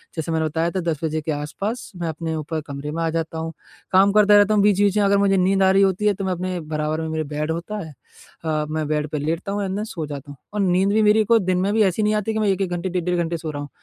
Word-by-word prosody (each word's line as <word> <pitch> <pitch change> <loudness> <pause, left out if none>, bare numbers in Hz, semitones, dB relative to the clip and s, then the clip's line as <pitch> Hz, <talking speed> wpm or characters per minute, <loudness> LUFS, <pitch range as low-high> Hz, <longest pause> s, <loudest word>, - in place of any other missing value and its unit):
जैसे 160 0 -3
मैंने 160 -1 +1
बताया 160 +3 -1
था 190 - -2
10 150 - -4
बजे 155 0 -1
के 155 - -3
आस-पास 195 +11 -4
मैं 175 -1 -3
अपने 160 +1 -4
ऊपर 155 0 -3
कमरे 140 +1 -5
में 165 - -3
आ 165 - +1
जाता 160 0 -3
हूँ, 160 0 -4 0.4
काम 195 +2 +5
करता 210 -1 +6
रहता 205 +1 +4
हूँ 205 - +3
बीच-बीच 205 0 +3
में 205 - +3
अगर 200 0 +4
मुझे 195 -1 +3
नींद 190 +1 +3
आ 190 - +5
रही 195 +1 +4
होती 195 +2 +1
है, 210 - +4
तो 195 0 -5
मैं 185 - 0
अपने 180 0 -3
बराबर 155 0 -2
में 160 - -3
मेरे 160 0 -2
बेड 150 +1 -1
होता 170 +6 -4
है 155 - -11 0.5
अ, 155 -1 0
मैं 155 -1 -2
बेड 150 0 -1
पे 150 - -3
लेटता 165 +6 -2
हूँ 205 0 -1
एंड 190 0 -3
देन 210 - -2
सो 165 -7 -5
जाता 145 -1 -8
हूँ। 140 - -12 0.2
और 210 - -2
नींद 185 +1 +2
भी 220 - +3
मेरी 215 +1 +5
कोई 230 +2 +4
दिन 185 -2 0
में 200 +2 0
भी 220 - +4
ऐसी 195 +2 +1
नहीं 210 - +2
आती 215 +1 -1
कि 220 - -1
मैं 215 - +1
1-1 195 -1 0
घंटे 175 +1 -2
डेढ़-डेढ़ 180 0 -1
घंटे 165 0 -2
सो 160 -1 -5
रहा 145 -1 -5
हूँ। 145 - -7
175 Hz, 300 wpm, -22 LUFS, 155-200 Hz, 0.5 s, करता